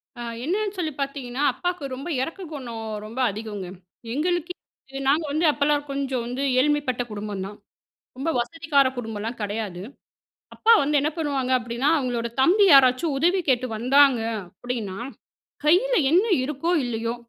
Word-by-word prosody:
அ 240 Hz, -, -8 dB, 0.2 s
என்னன்னு 405 Hz, +6 st, -1 dB
சொல்லி 320 Hz, -4 st, -1 dB
பார்த்தீங்கன்னா, 275 Hz, -1 st, -3 dB
அப்பாக்கு 350 Hz, -7 st, -3 dB
ரொம்ப 275 Hz, +6 st, -7 dB
இரக்ககுணம் 270 Hz, -, -6 dB, 0.2 s
ரொம்ப 230 Hz, +4 st, -7 dB
அதிகங்க. 205 Hz, -3 st, -6 dB, 0.5 s
எங்களுக்கு 350 Hz, +4 st, -1 dB
நாங்க 270 Hz, -, -31 dB
இது 270 Hz, -, -5 dB
நாங்க 305 Hz, +4 st, +3 dB
வந்து 315 Hz, +3 st, +1 dB
அப்பலாம் 290 Hz, 0 st, +1 dB
கொஞ்சம் 270 Hz, -3 st, -2 dB
வந்து 250 Hz, +3 st, -4 dB, 0.2 s
ஏழ்மைப்பட்ட 285 Hz, -3 st, +1 dB
குடும்பம்தான். 205 Hz, -1 st, -5 dB, 0.6 s
ரொம்ப 300 Hz, +5 st, -1 dB
வசதிக்கார 280 Hz, +2 st, +1 dB
குடும்பம்லாம் 225 Hz, 0 st, -5 dB
கிடையாது. 205 Hz, -3 st, -4 dB, 0.7 s
அப்பா 455 Hz, +1 st, +4 dB
வந்து 290 Hz, +1 st, +2 dB
என்ன 300 Hz, +2 st, 0 dB
பண்ணுவாங்க 280 Hz, -5 st, -1 dB
அப்பிடின்னா, 240 Hz, +3 st, -1 dB
அவுங்களோட 240 Hz, -3 st, -2 dB
தம்பி 380 Hz, +9 st, +5 dB
யாராச்சும் 275 Hz, +2 st, +5 dB
உதவி 355 Hz, +5 st, +3 dB
கேட்டு 255 Hz, 0 st, +2 dB
வந்தாங்க 265 Hz, +2 st, +4 dB, 0.3 s
அப்பிடின்னா, 210 Hz, -2 st, -5 dB, 0.7 s
கையில 385 Hz, +12 st, +4 dB
என்ன 365 Hz, +6 st, +4 dB, 0.2 s
இருக்கோ! 300 Hz, +5 st, -1 dB
இல்லையோ! 230 Hz, -1 st, -2 dB
270 Hz, 135 wpm, -24 LUFS, 235-310 Hz, 0.7 s, தம்பி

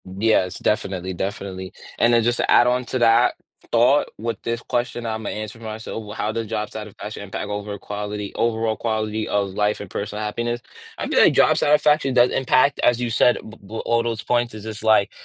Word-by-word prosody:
Yes. 95 Hz, -1 st, +1 dB
Definitely, 95 Hz, -3 st, -1 dB
definitely. 95 Hz, 0 st, -5 dB, 0.3 s
And 120 Hz, 0 st, +4 dB
then 115 Hz, -1 st, +4 dB
just 120 Hz, +1 st, +1 dB
to -, -, -1 dB
add 120 Hz, -, +6 dB
on 125 Hz, 0 st, +1 dB
to 130 Hz, -, -2 dB
that 115 Hz, -1 st, +4 dB, 0.4 s
thought 120 Hz, +5 st, +4 dB
with 115 Hz, -1 st, -4 dB
this 115 Hz, 0 st, -2 dB
question, 120 Hz, -1 st, -2 dB
Imma 110 Hz, -1 st, -3 dB
answer 110 Hz, +1 st, -6 dB
myself, 110 Hz, 0 st, -6 dB
well, 105 Hz, 0 st, -9 dB
how 105 Hz, -, -1 dB
does 115 Hz, 0 st, -3 dB
job 105 Hz, -1 st, -3 dB
satisfaction 105 Hz, 0 st, -7 dB
impact 100 Hz, +1 st, -5 dB
over 105 Hz, 0 st, -4 dB
quality 105 Hz, 0 st, -5 dB
overall 115 Hz, -1 st, 0 dB
quality 110 Hz, -1 st, -2 dB
of 100 Hz, -1 st, 0 dB
life 105 Hz, +2 st, 0 dB
and 100 Hz, -, -8 dB
personal 105 Hz, +1 st, -4 dB
happiness? 120 Hz, +3 st, -2 dB, 0.4 s
I -, -, -3 dB
feel -, -, +2 dB
like -, -, +6 dB
job -, -, +5 dB
satisfaction 150 Hz, -2 st, +3 dB
does 120 Hz, 0 st, +5 dB
impact, 135 Hz, +2 st, +2 dB
as 120 Hz, -1 st, +4 dB
you 120 Hz, -1 st, -1 dB
said, 120 Hz, +2 st, +4 dB
b 110 Hz, +1 st, -12 dB
b 105 Hz, -, -12 dB
all 115 Hz, 0 st, +2 dB
those 115 Hz, -2 st, -3 dB
points 120 Hz, -1 st, 0 dB
is 105 Hz, -, -9 dB
just 110 Hz, 0 st, -7 dB
like, 110 Hz, -3 st, +4 dB
110 Hz, 200 wpm, -22 LUFS, 105-120 Hz, 0.4 s, add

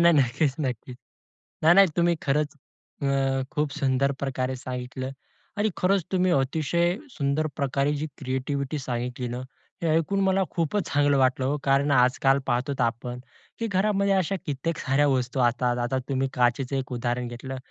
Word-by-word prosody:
नाही 170 Hz, 0 st, +6 dB
नक्कीच, 135 Hz, +2 st, +2 dB
नक्कीच. 125 Hz, -2 st, -4 dB, 0.7 s
नाही, 165 Hz, +2 st, +7 dB
नाही. 195 Hz, -1 st, +8 dB
तुम्ही 170 Hz, 0 st, +3 dB
खरंच 145 Hz, +2 st, 0 dB, 0.5 s
अ, 135 Hz, -1 st, +1 dB
खूप 150 Hz, -1 st, 0 dB
सुंदर 135 Hz, 0 st, +2 dB
प्रकारे 130 Hz, -1 st, -2 dB
सांगितलं. 125 Hz, +1 st, -5 dB, 0.5 s
आणि 215 Hz, +1 st, +2 dB
खरंच 190 Hz, -1 st, +2 dB
तुम्ही 185 Hz, -1 st, +2 dB
अतिशय 160 Hz, +6 st, +1 dB
सुंदर 145 Hz, -, 0 dB
प्रकारे 140 Hz, +1 st, 0 dB
जी 150 Hz, +2 st, -2 dB
क्रिएटिव्हिटी 135 Hz, +2 st, -2 dB
सांगितली 125 Hz, -1 st, -3 dB
ना, 120 Hz, -, -4 dB, 0.5 s
हे -, -, +1 dB
ऐकून 195 Hz, +5 st, 0 dB
मला 190 Hz, 0 st, +3 dB
खूपच 170 Hz, +3 st, -1 dB
चांगलं 145 Hz, -1 st, +3 dB
वाटलं 130 Hz, 0 st, +2 dB
हो. 145 Hz, +2 st, 0 dB
कारण 140 Hz, +1 st, +2 dB
आजकाल 135 Hz, +1 st, +4 dB
पाहतोत 130 Hz, +2 st, 0 dB
आपण, 120 Hz, +1 st, -2 dB, 0.4 s
की 230 Hz, -, -1 dB
घरामध्ये 200 Hz, 0 st, +2 dB
अशा 190 Hz, +1 st, +1 dB
कित्येक 150 Hz, +3 st, -2 dB
साऱ्या 145 Hz, +2 st, +2 dB
वस्तू 130 Hz, -1 st, 0 dB
असतात, 120 Hz, 0 st, +2 dB
आता 120 Hz, +2 st, -1 dB
तुम्ही 135 Hz, 0 st, +1 dB
काचेचं 125 Hz, +2 st, +1 dB
एक 130 Hz, -1 st, -3 dB
उदाहरण 120 Hz, 0 st, -2 dB
घेतलं. 130 Hz, +2 st, -6 dB
135 Hz, 155 wpm, -26 LUFS, 130-155 Hz, 0.7 s, नाही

